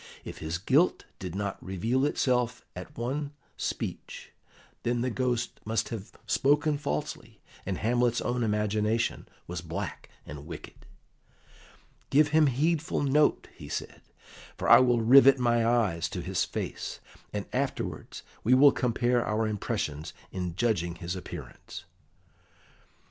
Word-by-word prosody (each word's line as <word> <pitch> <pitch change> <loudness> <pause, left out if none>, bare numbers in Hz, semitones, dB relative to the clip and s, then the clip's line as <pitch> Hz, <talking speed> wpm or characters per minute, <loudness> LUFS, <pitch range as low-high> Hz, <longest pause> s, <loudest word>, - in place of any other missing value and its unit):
If - - -7
his 80 +2 -3
guilt 135 - +2
did 90 -2 -6
not 100 -1 -3
reveal 115 +9 0
itself 125 -3 0
at 90 0 -9
one 140 +5 -3 0.2
speech, - - -5 0.5
then 120 0 0
the 125 +1 0
Ghost 125 -1 -1
must 110 +1 -1
have 110 -4 -6
spoken 145 +1 +2
falsely, 75 - -4 0.3
and 95 -2 -1
Hamlet's 120 +1 +2
own 125 0 -1
imagination 105 +1 0 0.2
was 85 -1 -5
black 85 0 -5 0.2
and 75 +1 -9
wicked. 85 -3 -10 1.2
"Give 145 +2 +4
him 155 0 +5
heedful 155 +4 +1
note," 145 +2 +3
he - - -10
said, - - -5 0.6
"for - - -2
I - - +9
will 125 -2 +3
rivet 135 +3 +8
my 120 -2 +2
eyes 110 -8 +1
to - - -4
his - - 0
face, - - -5 0.3
and - - -3
afterwards - - -3 0.2
we 125 +3 +5
will 140 +2 +8
compare 120 -1 +1
our 110 +1 0
impressions 80 -8 -3 0.2
in 90 -3 -4
judging 90 -6 0
his 85 +1 -4
appearance." 60 -9 -9
115 Hz, 130 wpm, -28 LUFS, 95-130 Hz, 1.2 s, I